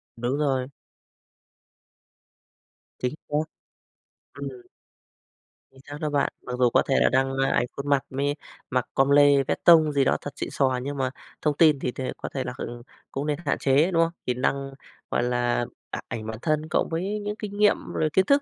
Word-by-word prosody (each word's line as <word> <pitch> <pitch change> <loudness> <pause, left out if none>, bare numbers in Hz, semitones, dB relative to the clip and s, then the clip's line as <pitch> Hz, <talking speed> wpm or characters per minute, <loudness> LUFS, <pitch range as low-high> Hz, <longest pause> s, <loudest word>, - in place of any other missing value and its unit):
Đúng 120 +4 -1
rồi. 135 -4 0 2.3
Chính 125 +3 -2
xác. 150 +1 0 0.9
Ừm. 140 -1 -6 1.2
Chính 135 - -18
xác 145 - -6
đó 155 - 0
bạn, 145 -1 +1
mặc 125 - -5
dù 125 -1 +5
có - - +3
thể 135 - +2
là - - +4
đăng, 135 0 +1
a, 135 0 +2
ảnh - - +2
khuôn 140 +1 -4
mặt 140 -2 +3
mới 140 +2 -1 0.3
mặc 125 -2 0
com 135 +1 +3
lê, 140 -1 +6
vét - - -3
tông 160 -3 +7
gì 140 -1 +3
đó 135 - +2
thật 145 - -6
xịn - - -4
xò, 130 -2 +1
nhưng 140 +1 -4
mà 130 -1 0 0.3
thông 150 -2 0
tin 155 -4 +5
thì 125 - -2
thì 130 - -6
có - - -5
thể - - -1
là, - - -5
ừm, 120 0 -6 0.3
cũng 140 +2 -3
nên 150 -1 0
hạn - - +1
chế, 145 +6 +3
đúng 165 -1 +4
không? 165 - -1 0.2
Thì 125 - +2
năng 135 +2 -1 0.4
gọi - - +1
là, 120 0 +1 0.2
a - - -4
ảnh 115 -1 -5
bản 110 0 -5
thân 155 +1 0
cộng - - +1
với 190 +6 -2
những 210 0 -3
kinh 205 -2 -6
nghiệm 210 0 +5 0.2
rồi 155 - +1
kiến 190 - +4
thức 280 +4 +4
140 Hz, 200 wpm, -25 LUFS, 130-155 Hz, 2.3 s, tông